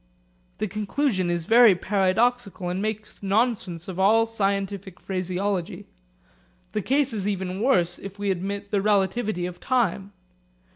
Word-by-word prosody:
This 215 - -2
conclusion 210 -1 -1
is 170 -1 -1
very 230 -2 +7
paradoxical 200 +1 0
and 180 +2 -2
makes 215 0 -4
nonsense 195 -5 0
of 190 -1 -6
all 220 +4 +5
scientific 200 -3 -2
phraseology. 185 +1 -3 0.9
The - - -1
case 275 -1 +1
is 205 -2 -2
even 190 -1 -2
worse 175 -9 +2
if 195 0 -9
we 200 -1 0
admit 200 +2 -4
the 200 -2 +2
relativity 200 -1 +1
of 180 0 -7
time. 205 -6 0
200 Hz, 135 wpm, -25 LUFS, 185-215 Hz, 0.9 s, very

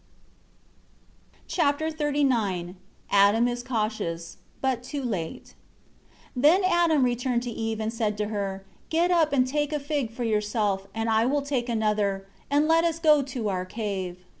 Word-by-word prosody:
Chapter 315 -1 +1
XXXIX 255 - 0 0.4
Adam 205 +4 +5
is 240 0 -2
cautious 215 -9 -3 0.2
but 260 -3 0
too 275 +2 -5
late. 185 -10 -4 0.8
1 250 - -3
Then 335 +7 +5
Adam 345 -5 +3
returned 245 0 0
to 245 - -4
Eve, 225 -1 -3
and 220 +1 -2
said 215 -2 -1
to 210 0 -2
her, 195 -2 -3 0.2
"Get 340 +2 +2
up, 330 -3 +3
and 260 -3 +3
take 295 +3 -1
a 300 - -1
fig 285 -4 -2
for 235 +2 -5
yourself, 210 -3 0
and 225 0 -1
I 225 +1 +3
will 285 +1 +1
take 260 -4 -2
another; 210 -3 0 0.2
and 290 +2 +3
let 325 +1 +4
us 335 -1 +1
go 305 -3 +5
to 255 -5 -3
our 185 -2 -1
cave." 185 -3 -5
240 Hz, 160 wpm, -26 LUFS, 210-290 Hz, 0.8 s, Adam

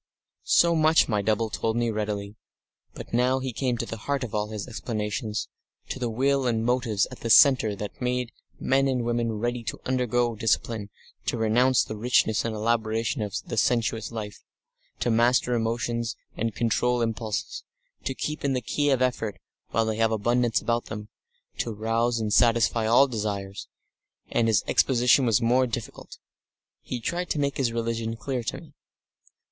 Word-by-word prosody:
Section - - +4
7 165 - +2
So - - +1
much 160 +1 +5
my 105 -4 0
double 110 +1 0
told 110 +2 -1
me 120 -1 +1
readily. 105 -1 -3 0.6
But - - -9
now 125 +2 +3
he 130 -1 -4
came 125 0 -1
to 115 - -2
the 115 - -6
heart 140 +5 -2
of 120 - -6
all 105 0 0
his 110 0 -5
explanations, 105 -2 -3 0.4
to - - -4
the 120 -2 -1
will 135 +3 +1
and 115 -2 0
motives 120 -5 +1
at - - -10
the 115 - -4
centre 120 -4 +6
that 105 +3 -7
made 125 -1 -1 0.3
men 135 +1 +2
and 130 -2 0
women 120 -1 0
ready 120 +2 -2
to - - -4
undergo 120 -2 +1
discipline, 110 -1 -1 0.4
to - - 0
renounce 120 +3 +3
the 110 - -6
richness 110 -2 +2
and 115 -1 -3
elaboration 115 +2 0
of 105 -2 -3
the - - -5
sensuous 115 -1 +1
life, 105 -3 -7 0.6
to 120 - +1
master 120 +2 +3
emotions 115 0 -1 0.2
and 115 -1 -2
control 120 +1 +1
impulses, 115 - -3 0.4
to - - -3
keep 150 0 -4
in 140 -1 +1
the 130 - +1
key 145 +5 0
of 130 -2 +3
effort 115 -5 -1 0.3
while 115 0 +1
they 110 -1 -2
had 115 0 +2
abundance 120 +2 +1
about 120 0 -1
them 105 -1 -7 0.5
to 115 - -1
rouse 115 +2 0
and 105 -2 -1
satisfy 115 -1 +3
all 120 +5 +6
desires, 100 -4 -4 0.6
and 115 - +2
his 110 -2 +3
exposition 125 0 +4
was 115 -1 +3
more 125 +2 +3
difficult. 115 -1 -7 0.6
He 125 - -5
tried 175 +9 -3
to 150 - -1
make 140 -1 0
his 130 -4 +1
religion 115 -1 -2
clear 130 +1 -3
to 135 - -3
me. 155 -2 -16
115 Hz, 175 wpm, -26 LUFS, 110-125 Hz, 0.6 s, centre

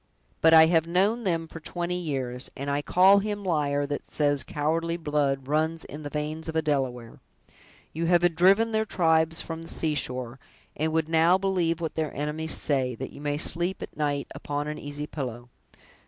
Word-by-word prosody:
But 160 - +6
I 160 0 +9
have 165 0 +2
known 200 +7 +1
them 165 -3 0
for 160 - -9
twenty 175 +2 -3
years, 130 -6 -4
and 140 +1 -3
I 145 +1 0
call 190 +6 +5
him 205 0 -3
liar 145 -5 0
that 145 0 -5
says 145 -2 +2
cowardly 165 +3 -1
blood 145 -4 -1
runs 160 +2 0
in 150 +2 -8
the 145 - -6
veins 155 +2 -4
of 160 - -5
a 160 - +2
Delaware. 130 -6 -2 0.7
You 165 +1 -2
have 175 -1 +3
driven 195 +7 +4
their 220 0 +1
tribes 165 -4 +2
from 165 0 -6
the 165 - -10
seashore, 130 -6 -2 0.4
and 155 +2 -1
would 160 -1 0
now 165 +3 +4
believe 180 -4 0
what 165 -2 -3
their 155 -2 -2
enemies 150 +2 -2
say, 130 -4 0
that 130 +3 -6
you - - -12
may 145 0 -1
sleep 175 +4 +1
at - - -10
night 145 -2 -1
upon 145 0 -4
an 150 - -5
easy 145 +1 -6
pillow. 125 -5 -6
160 Hz, 185 wpm, -26 LUFS, 145-170 Hz, 0.7 s, I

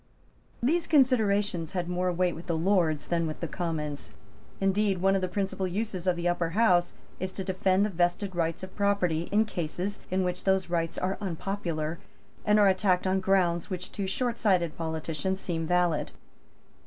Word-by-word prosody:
These 325 +7 +2
considerations 205 - +2
had 180 -2 -2
more 180 +1 0
weight 180 0 +1
with 170 - -10
the 165 -2 0
Lords 165 -4 +1
than 170 -1 +1
with 155 - -5
the 170 - -3
Commons. 155 -4 -4 0.5
Indeed 195 0 +2
one 195 +2 +3
of 195 - +1
the 185 - 0
principal 190 0 -2
uses 190 -1 -3
of 180 - +3
the 175 0 -2
Upper 175 -1 0
House 180 -6 +4 0.3
is 185 0 -3
to 190 - -4
defend 190 +1 +2
the 210 - -2
vested 175 +2 0
rights 165 +1 -1
of 185 0 -8
property 185 -5 +1
in 215 +2 +4
cases 180 +1 -3
in 185 +1 +1
which 180 0 -2
those 190 -2 +1
rights 165 -1 -1
are 190 +1 -1
unpopular, 170 -4 -3 0.4
and 210 0 +4
are 205 - +6
attacked 185 -1 +2
on 190 0 +2
grounds 185 -3 +1
which 185 -1 -5
to 200 -2 -3
shortsighted 195 -7 +1
politicians 160 +3 -3
seem 165 -4 -2
valid. 175 -3 +1
185 Hz, 175 wpm, -28 LUFS, 170-195 Hz, 0.5 s, are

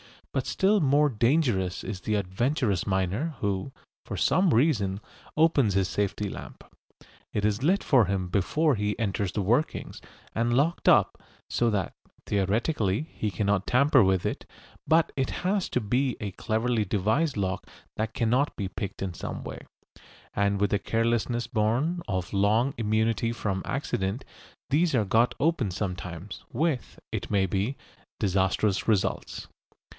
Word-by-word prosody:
But - - -1
still 200 +2 +3
more 145 0 +4
dangerous 115 - +1
is 95 -3 -5
the 110 - -1
adventurous 105 - 0
miner 100 - -1
who, 100 +5 -1 0.3
for - - -5
some 185 -2 +3
reason, 110 -8 +2 0.4
opens 150 -9 +4
his 95 -2 +2
safety 105 0 -1
lamp. - - -9 0.7
It 105 - -1
is 105 +2 0
lit 185 +8 +2
for 125 -6 +4
him 95 -1 -2
before 145 - +2
he 105 0 -1
enters 100 -3 -1
the 105 - -1
workings, 120 +10 0 0.3
and 120 +1 +1
locked 155 +6 +1
up, - - +4 0.3
so 120 - +1
that, 95 -5 -1 0.3
theoretically, 105 - 0
he 105 - -2
cannot 100 +1 0
tamper 135 0 +5
with 95 -1 +2
it; - - -3 0.4
but 160 0 +4
it 135 -1 0 0.2
has 195 0 +1
to 125 - 0
be 125 +4 0
a 100 -2 -3
cleverly 110 +3 0
devised 110 - +1
lock 95 -1 -2 0.3
that 110 +1 -2
cannot 125 +5 +1
be 100 -3 -3
picked 100 -1 -5
in 95 -2 -3
some - - -6
way, - - -7 0.7
and 100 0 +1
with 100 - +2
the 100 - +2
carelessness 115 +2 0
born 120 +9 0
of 95 -4 -3
long 110 +7 +2
immunity 110 +1 +1
from 100 -5 -2
accident 120 -4 -2 0.5
these 160 +1 +3
are 110 -4 +2
got 115 +5 +2
open 145 -7 +1
sometimes, 90 0 -5
with, 150 -1 -1
it - - -4
may 100 -2 +2
be, 100 +8 -1 0.4
disastrous 95 +1 +1
results. 105 -4 -1
110 Hz, 150 wpm, -27 LUFS, 100-135 Hz, 0.7 s, tamper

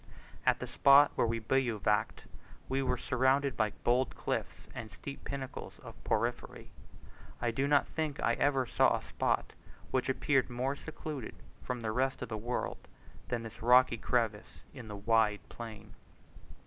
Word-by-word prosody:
At - - +5
the - - -5
spot 140 +1 +6
where - - +1
we 115 0 0
bivouacked, 110 -3 0 0.4
we 135 +1 0
were 125 -1 0
surrounded 130 +2 +2
by 110 -1 +1
bold 125 +2 +2
cliffs - - -4
and 110 - -6
steep 140 +5 -9
pinnacles 135 -2 -6
of - - -13
porphyry. - - -2 0.7
I 120 0 0
do 135 +5 0
not 145 -1 +4
think 155 -3 -3
I - - +2
ever 135 -2 +2
saw - - +3
a - - -9
spot - - -1 0.4
which 130 0 0
appeared 130 0 +2
more 130 +3 -1
secluded 150 -4 -7 0.3
from 125 -1 -4
the 110 -1 -2
rest 130 +2 0
of 125 - -6
the 110 - -3
world, 120 +3 -4 0.4
than 120 -2 -2
this 110 0 -10
rocky 125 +1 +5
crevice 115 -3 -1
in 125 -5 -9
the 105 - -6
wide 105 0 +2
plain. 110 -2 -9
125 Hz, 160 wpm, -32 LUFS, 115-135 Hz, 0.7 s, spot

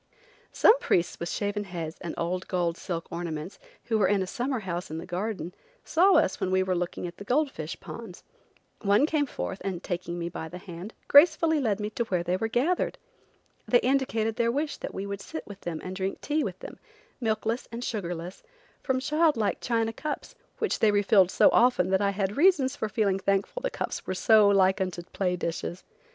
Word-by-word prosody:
Some 475 +3 +5
priests 175 - 0
with 170 - -3
shaven 205 0 -2
heads 170 -4 -6
and 170 - -5
old 180 +2 -2
gold 175 -3 0
silk 170 -3 -5
garments, 170 +1 -5 0.2
who 225 -2 0
were 195 - +4
in 195 0 +2
a - - -3
summer 245 +5 -2
house 180 -2 -4
in 160 - -5
the 165 - -6
garden, 180 -1 -4 0.3
saw 375 +4 +4
us - - +3
when 185 - -1
we 185 0 +3
were 185 0 0
looking 175 0 -3
at 175 0 -7
the - - -8
gold 275 +6 +1
fish - - -6
ponds. - - -9 0.6
One 205 +6 +4
came 305 -2 +1
forth, 195 -6 -5
and, 185 -3 -3
taking 175 -1 -4
me 170 0 -3
by 160 -2 -6
the 180 - -8
hand, 180 +3 -9
gracefully 320 +1 +6
led 220 -6 0
me 210 0 -3
to 235 - -1
where 180 -5 -1
they 180 +1 0
were 225 +4 -1
gathered. 275 +11 0 0.7
They 245 - +6
indicated 235 -4 0
their 235 -1 +2
wish 290 +4 -2
that - - -6
we 195 - -3
should 200 0 -5
sit 315 - -7
with 205 -1 -11
them 165 -2 -4
and 185 0 -5
drink 190 0 -3
tea 300 +1 0
with - - -4
them, - - -9 0.4
milkless 225 0 -1
and 235 +1 -5
sugarless, 180 -5 -4 0.4
from 260 -1 0
child 305 +1 +2
like 215 -2 0
China 225 -1 0
cups, 300 +5 -5 0.2
which 440 - -1
they 220 - +5
re 205 0 +2
filled 195 -3 +5
so - - +5
often 235 -7 +4
that 190 0 +3
I 200 - +3
had 200 0 -1
reasons 290 -5 +4
for 220 - -3
feeling 195 -2 +1
thankful 195 - 0
the - - -1
cups - - -4
were 185 - -2
so 215 +1 +5
like 190 0 +4
unto 185 -2 -2
play 180 -2 0
dishes. 175 +1 -4
200 Hz, 210 wpm, -27 LUFS, 180-245 Hz, 0.7 s, gracefully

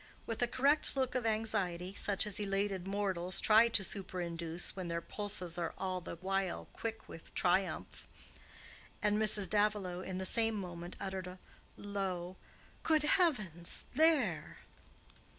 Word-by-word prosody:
with 225 0 -4
a 245 - +3
correct 280 +5 +2
look 260 -2 0
of 250 -3 -1
anxiety 200 -5 -1
such 200 0 +1
as 210 -1 -2
elated 195 -2 -1
mortals 190 -3 -1
try 220 +2 +6
to 225 -3 +3
super 190 -1 -1
induce 170 0 -3
when 185 -2 -5
their 170 0 -2
pulses 180 -2 -3
are 170 -1 -3
all 185 -1 -3
the 170 - -7
while 195 -1 -2
quick 225 -1 -6
with 165 - -11
triumph; 185 0 0 0.9
and 210 0 +2
Mrs. 210 -2 +7
Davilow, 205 -4 +1
in 185 0 -5
the 190 - -3
same 225 +2 +3
moment, 175 -3 -6
uttered 190 -1 -4
a 180 +1 -9 0.4
low 190 -3 -4 0.5
"Good 310 -2 +2
heavens! 230 - +1
There!" 265 - +2
195 Hz, 145 wpm, -34 LUFS, 180-215 Hz, 0.9 s, Mrs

